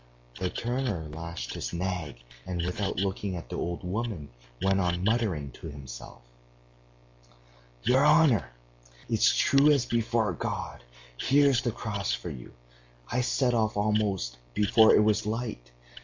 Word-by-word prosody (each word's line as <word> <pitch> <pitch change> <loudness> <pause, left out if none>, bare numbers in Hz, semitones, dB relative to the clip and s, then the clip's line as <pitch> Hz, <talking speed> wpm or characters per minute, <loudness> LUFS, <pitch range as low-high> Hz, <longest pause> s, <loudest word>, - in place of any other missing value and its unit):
The 90 - -1
turner 120 -10 -2
lashed 80 -6 -6
his - - -5
nag, 85 -8 -3 0.2
and 90 -2 -2
without 95 +2 -2
looking 95 0 -2
at 85 -8 -8
the - - -5
old 85 +2 -3
woman 95 -5 -3 0.3
went 95 0 +2
on 90 -1 0
muttering 100 - 0
to - - -10
himself: 65 -5 -10 1.6
"'Your 130 +3 +4
honor! 150 - +5 0.6
It's - - +3
true 140 +2 +5
as 140 -4 +4
before 115 -3 0
God.... 70 - -4 0.4
Here's 140 -2 +4
the 120 - -1
Cross 100 -2 -3
for 85 - -4
you, 65 -4 -10 0.6
I 125 +2 +1
set 125 0 +1
off 110 -2 +1
almost 100 - 0 0.2
before 110 +2 +5
it 105 - +5
was 105 0 +1
light. 110 - -4
100 Hz, 140 wpm, -28 LUFS, 85-115 Hz, 1.6 s, honor